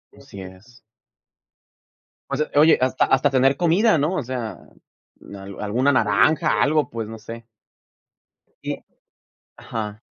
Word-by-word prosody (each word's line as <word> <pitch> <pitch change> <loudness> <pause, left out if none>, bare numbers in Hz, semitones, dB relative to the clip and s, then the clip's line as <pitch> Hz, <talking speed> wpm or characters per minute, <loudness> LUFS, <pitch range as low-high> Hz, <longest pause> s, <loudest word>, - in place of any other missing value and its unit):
Así 100 - -12
es. 95 +6 -14 1.5
O 140 - -1
sea 150 +2 -2
oye, 155 +2 +6
hasta 130 0 +2
hasta 135 +2 +2
tener 135 0 +3
comida, 180 +5 +3
¿no? 155 +6 0
O 150 - -2
sea, 115 -7 -5 0.8
al 95 0 -10
alguna 120 +7 +1
naranja, 130 +8 +2
algo, 150 +1 +2
pues, 115 -1 -5
no 110 +1 -8
sé. 115 +1 -10 1.2
Sí. - - -5 0.7
Ajá. 105 -1 -6
125 Hz, 125 wpm, -22 LUFS, 110-145 Hz, 1.5 s, oye